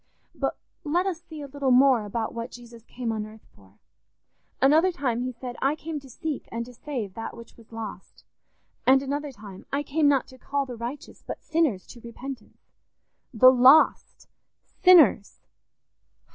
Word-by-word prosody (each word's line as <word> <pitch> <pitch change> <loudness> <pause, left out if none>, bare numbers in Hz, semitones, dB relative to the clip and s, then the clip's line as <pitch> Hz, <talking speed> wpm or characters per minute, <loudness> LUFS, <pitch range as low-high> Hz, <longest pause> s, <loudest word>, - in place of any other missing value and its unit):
"But - - -3 0.3
let 345 +4 0
us 355 -4 -3
see 315 -3 -10
a - - -7
little 275 -1 -2
more 255 -3 +5
about 220 +2 -3
what 230 +1 -5
Jesus 235 -2 -13
came 240 -2 -4
on 215 -1 -3
earth 215 +1 -13
for. 100 0 -22 0.8
Another 315 +7 +4
time 255 -7 -2
he 255 +1 -2
said, 245 0 -8
'I 275 +2 +2
came 315 -1 -6
to 270 -1 -16
seek 305 +3 -5
and 235 0 -4
to 250 - -13
save 240 -7 -5
that 225 +2 -7
which 235 - -13
was 230 -1 -19
lost'; 220 -4 -9 0.6
and 265 +1 +5
another 285 +1 -3
time, 205 -6 -12
'I 280 +1 -1
came 295 +1 +1
not 275 -3 +3
to 260 - -15
call 280 +1 -2
the 250 -2 -7
righteous 240 +5 -7
but - - -8
sinners 310 - 0
to 240 - -13
repentance.' 240 +1 -10 0.6
"The 255 +1 +7
_lost!... 260 +5 +4 0.6
Sinners! 330 - +5
255 Hz, 170 wpm, -25 LUFS, 230-290 Hz, 0.8 s, The